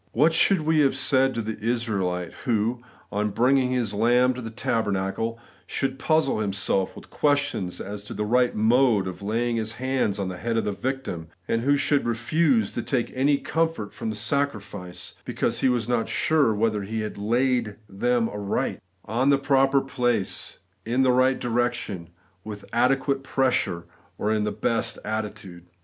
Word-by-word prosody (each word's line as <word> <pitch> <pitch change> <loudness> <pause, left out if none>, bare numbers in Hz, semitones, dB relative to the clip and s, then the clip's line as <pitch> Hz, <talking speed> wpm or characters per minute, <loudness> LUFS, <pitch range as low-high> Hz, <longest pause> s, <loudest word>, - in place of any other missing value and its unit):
What 155 +7 +4
should 175 +2 +4
we 155 0 +2
have 140 -3 +3
said 135 0 +2
to 115 - -2
the 110 0 -5
Israelite, 105 -6 -1
who, 115 0 -1 0.3
on 105 +1 0
bringing 125 +4 +3
his 125 -5 -1
lamb 120 +4 +3
to 125 - -7
the 115 - -5
tabernacle, 110 -1 -1 0.3
should 135 -1 -2
puzzle 155 -5 +2
himself 100 -2 0
with - - -13
questions 145 -11 0
as 100 +1 -6
to - - -7
the 105 - -2
right 125 +3 +2
mode 115 -1 +3
of 95 0 -6
laying 115 +3 0
his 110 0 -2
hands 130 -5 -1
on 100 -2 -2
the 90 -1 -5
head 115 +4 -2
of 115 - 0
the 105 - 0
victim, 100 -6 -4 0.2
and 115 - 0
who 145 +3 +3
should 145 -2 +1
refuse 165 - +1
to - - -3
take 125 -5 -1
any 140 +2 +3
comfort 160 -11 -1
from 110 - -4
the 110 - -3
sacrifice, 105 -6 -3
because - - -1
he 130 - +3
was 120 -3 0
not 120 -2 0
sure 155 -7 +2
whether 105 0 0
he 110 +3 -3
had 105 -1 -5
laid 120 0 +1
them 120 +3 +1
aright; 105 -2 -2 0.2
— - - -42
on 125 +6 +1
the 140 - +5
proper 135 0 +3
place, 120 -6 -1 0.3
in 125 +5 +1
the 130 - +4
right 130 +1 +3
direction, 120 -7 -2 0.3
with 105 -2 -8
adequate 135 +3 +2
pressure, 130 -10 0 0.3
or 105 - 0
in 105 -1 0
the 105 - -1
best 115 +1 0
attitude 105 -5 -5
115 Hz, 175 wpm, -25 LUFS, 105-130 Hz, 0.3 s, the